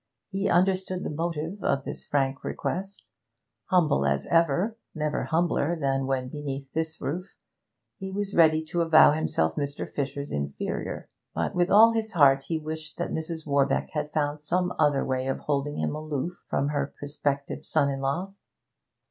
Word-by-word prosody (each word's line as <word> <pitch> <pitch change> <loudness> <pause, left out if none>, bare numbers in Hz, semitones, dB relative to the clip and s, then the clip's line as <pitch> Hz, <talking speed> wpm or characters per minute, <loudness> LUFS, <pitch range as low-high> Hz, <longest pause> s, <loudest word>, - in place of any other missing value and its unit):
He 195 0 0
understood 185 +1 +2
the - - -3
motive 165 +4 -3
of 135 - +1
this - - -7
frank 135 -1 0
request; 195 +3 -4 0.6
humble 165 - +3
as 70 0 +1
ever 170 +6 +2 0.2
never 150 -1 -1
humbler 170 0 +1
than 135 -2 0
when 130 -1 -1
beneath 140 -1 -6
this 160 0 -2
roof 180 +7 -4 0.6
he 190 -1 -5
was 200 +1 -3
ready 160 -1 +5
to 170 +2 -1
avow 160 -2 +7
himself 80 - 0
Mr. 140 0 -2
Fisher's 140 0 -4
inferior; 70 -1 -3 0.3
but - - -1
with 175 +1 +2
all 225 +4 +7
his 220 -1 -2
heart 135 -5 +5
he 165 - 0
wished 155 0 -6
that - - -2
Mrs. 160 0 -4
Warbeck 140 -2 +1
had 150 -1 -3
found 150 -1 -1
some 180 +4 0
other 145 -3 +3
way 130 0 -1
of 135 - -2
holding 145 0 -1
him - - -1
aloof 155 +2 -3
from 140 +1 +1
her 145 -1 -2
prospective 145 -1 -3
son 140 - +2
in 135 - -3
law. 165 +9 -2
150 Hz, 165 wpm, -27 LUFS, 140-175 Hz, 0.6 s, avow